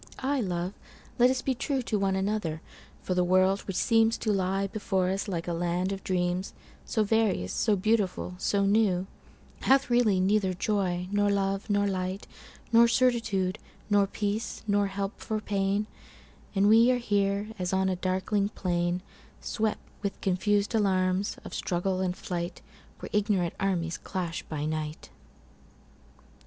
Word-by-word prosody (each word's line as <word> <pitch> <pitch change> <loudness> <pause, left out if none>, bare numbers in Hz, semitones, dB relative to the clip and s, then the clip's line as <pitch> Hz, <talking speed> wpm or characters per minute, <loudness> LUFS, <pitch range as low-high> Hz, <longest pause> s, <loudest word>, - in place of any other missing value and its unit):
Ah, 275 +1 0
love, 180 -2 -2 0.5
let 245 +1 +7
us 260 0 -1
be 265 - +1
trueTo 255 -4 -1
one 195 -1 +1
another! 190 -5 -1 0.4
for 185 - -1
the 180 0 +2
world, 185 +2 +3
which 195 - -3
seemsTo 225 -1 +2
lie 195 +1 0
before 195 -2 -1
us 195 +2 -2
like 175 -4 -3
a 175 - -1
land 175 +2 -1
of 195 0 -5
dreams, 180 0 -1 0.3
So 220 - +1
various, 210 - +1
so 215 -2 +2
beautiful, 200 -2 0
so 200 +1 +1
new, 195 -3 +2 0.5
Hath 270 -2 +3
really 230 -6 +4
neither 190 0 +2
joy, 180 -3 -1
nor 205 0 +2
love, 195 +1 0
nor 205 0 +2
light, 190 0 -2 0.5
Nor 235 +1 +7
certitude, 230 -6 +1 0.3
nor 200 -1 +4
peace, 205 +3 -3
nor 205 -1 +2
help 195 +1 -4
for 220 -1 -2
pain; 200 0 0 0.7
And 195 +1 +4
we 225 +3 +6
are 255 - +3
here 205 -2 0
as 180 -1 -1
on 190 0 +2
a 190 - +1
darkling 190 +3 0
plainSwept 180 +4 -2 0.2
with 200 -1 -3
confus'd 205 +3 +1
alarms 190 -2 +1
of - - -8
struggle 185 +1 -1
and 180 -1 -1
flight, 175 -1 -4 0.3
Where - - -8
ignorant 200 -5 +1
armies 175 -4 -1
clash 175 -3 -4
by 150 -2 -4
night. 155 0 -4
195 Hz, 145 wpm, -28 LUFS, 185-210 Hz, 0.7 s, let